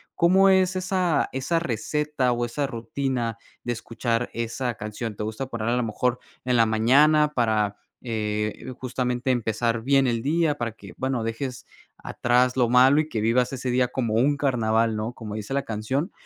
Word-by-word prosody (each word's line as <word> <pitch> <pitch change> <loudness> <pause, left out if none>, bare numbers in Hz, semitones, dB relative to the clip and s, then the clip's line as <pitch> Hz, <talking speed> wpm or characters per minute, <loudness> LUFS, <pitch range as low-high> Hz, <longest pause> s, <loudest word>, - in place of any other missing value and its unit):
¿cómo 190 +3 +5
es 190 -1 +3
esa 185 -4 0
esa 135 +6 0
receta 150 0 -1
o 120 0 -1
esa 140 +5 -2
rutina 120 -1 -3 0.3
de 120 - -2
escuchar 115 +1 -2
esa 115 +2 -2
canción? 105 +1 -6
¿Te 105 - -4
gusta 110 +5 -4
poner 115 -3 -4
a 120 - +1
lo 125 - +1
mejor 125 +3 -1 0.2
en 125 -1 +1
la 115 - +5
mañana 145 +8 +4
para, 110 -4 +1 0.2
eh, 105 +1 -3
justamente 125 0 -2
empezar 115 -1 -1
bien 135 0 +3
el 115 -1 -1
día? 155 0 +1
Para 120 -2 -2
que, 100 -4 -13
bueno, 130 -3 -1
dejes 125 +3 -4 0.3
atrás 125 +1 +1
lo 120 -2 +3
malo 130 +4 +5
y 155 - 0
que 110 -6 -2
vivas 120 +4 +2
ese 130 -1 -3
día 125 0 +2
como 120 -4 -1
un 140 +5 +3
carnaval, 115 -5 +1
¿no? 110 +3 -3
Como 110 -3 -7
dice 110 +4 -5
la 140 0 0
canción, 130 - -2
125 Hz, 175 wpm, -25 LUFS, 115-135 Hz, 0.3 s, cómo